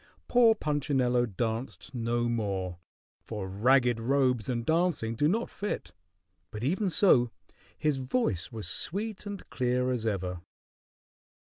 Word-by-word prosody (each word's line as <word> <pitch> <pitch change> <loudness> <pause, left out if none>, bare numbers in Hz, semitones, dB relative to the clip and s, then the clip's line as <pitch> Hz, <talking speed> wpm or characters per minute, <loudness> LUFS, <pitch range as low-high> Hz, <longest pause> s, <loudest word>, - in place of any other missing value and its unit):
Poor 235 -2 +5
Punchinello 135 - +1
danced 110 +2 -4
no 120 0 0
more, 100 -6 -2 0.4
for 105 -4 -5
ragged 120 +4 +3
robes 125 -2 +1
and 120 -2 -1
dancing 160 -8 +1
do 145 +6 +2
not 225 +8 +1
fit; 200 - -4 0.6
but 105 +1 -6
even 185 - +1
so, 150 - +4 0.5
his 150 -3 +1
voice 130 - -1
was 110 -6 -5
sweet 205 - -2
and 200 -1 -7
clear 125 0 +1
as 115 -3 -1
ever. 90 -4 -2
125 Hz, 125 wpm, -29 LUFS, 110-150 Hz, 0.6 s, Poor